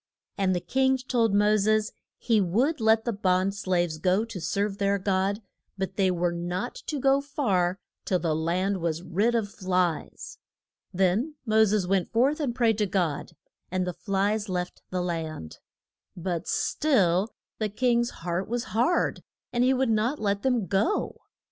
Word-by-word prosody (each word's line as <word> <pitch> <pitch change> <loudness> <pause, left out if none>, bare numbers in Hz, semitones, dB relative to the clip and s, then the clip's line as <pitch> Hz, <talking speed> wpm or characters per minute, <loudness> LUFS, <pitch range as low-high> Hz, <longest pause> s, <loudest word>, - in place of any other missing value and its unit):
And 190 -2 +1
the - - 0
king 265 +8 +2
told 245 -4 +1
Mo 205 +1 +4
ses 215 +1 +2 0.3
he 225 -3 +2
would 235 - +1
let 220 0 +3
the 235 - 0
bond 190 -1 +1
slaves 175 -5 -1
go 185 +6 +2
to 225 -6 -7
serve 200 +5 -1
their 200 0 +2
God, 195 +2 0 0.3
but 190 0 -3
they 195 -2 +2
were 175 -1 0
not 175 +6 -3
to 295 - -2
go 275 +1 +3
far 195 -11 0 0.3
till 185 - +1
the 165 -3 -1
land 180 +5 0
was 165 -1 -2
rid 205 +7 +1
of 210 -3 -1
flies. 180 -4 -2 0.5
Then 195 - +1
Mo 220 -1 +5
ses 205 -2 +1
went 190 -1 0
forth 270 +7 +2
and 265 -6 -1
prayed 230 -4 +2
to 210 - +2
God, 175 -6 -1 0.4
and 185 0 -1
the 180 - -3
flies 205 +3 -1
left 180 -1 -3
the 180 -1 -2
land. 160 - -5 0.6
But 175 -1 -3
still 205 - +2 0.3
the 215 -1 0
king's 240 +2 +1 0.2
heart 175 +2 -1
was 240 0 -1
hard, 245 +11 +1 0.3
and 240 0 +2
he 255 - +4
would 260 -2 +1
not 225 +7 +1
let 200 -3 -1
them 245 -4 +1
go. 200 - 0
200 Hz, 165 wpm, -27 LUFS, 180-230 Hz, 0.6 s, Mo